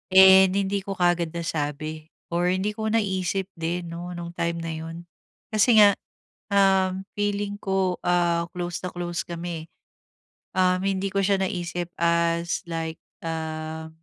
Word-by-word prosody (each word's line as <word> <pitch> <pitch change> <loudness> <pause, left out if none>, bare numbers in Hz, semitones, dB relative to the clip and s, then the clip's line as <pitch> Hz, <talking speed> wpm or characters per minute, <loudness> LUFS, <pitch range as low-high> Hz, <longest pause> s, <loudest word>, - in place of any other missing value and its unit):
and 190 0 +9
hindi 200 0 +1
ko 195 0 -5
kaagad 175 -2 +1
nasabi 155 -1 -3 0.2
or 175 +1 +1
hindi 185 +3 +1
ko 220 +1 -4
naisip 195 -3 0
din 170 +1 -3
'no 175 +1 -6
nung 170 0 -6
time 170 -1 -1
na 165 - -3
yun. 165 +2 -7 0.5
Kasi 220 +2 +5
nga, 205 -1 +9 0.6
um, 190 -1 +3
feeling 205 0 -2
ko, 190 -2 0
ah, 170 -1 +2
close 175 -1 -3
na 180 - -3
close 175 -1 -2
kami. 170 -1 -5 0.9
Um, 185 -1 +3
hindi 195 0 0
ko 200 - 0
siya 195 0 +3
naisip 175 -2 -3
as, 170 0 +1
like 165 -1 -3 0.3
ah, 160 0 -4
175 Hz, 140 wpm, -25 LUFS, 170-190 Hz, 0.9 s, and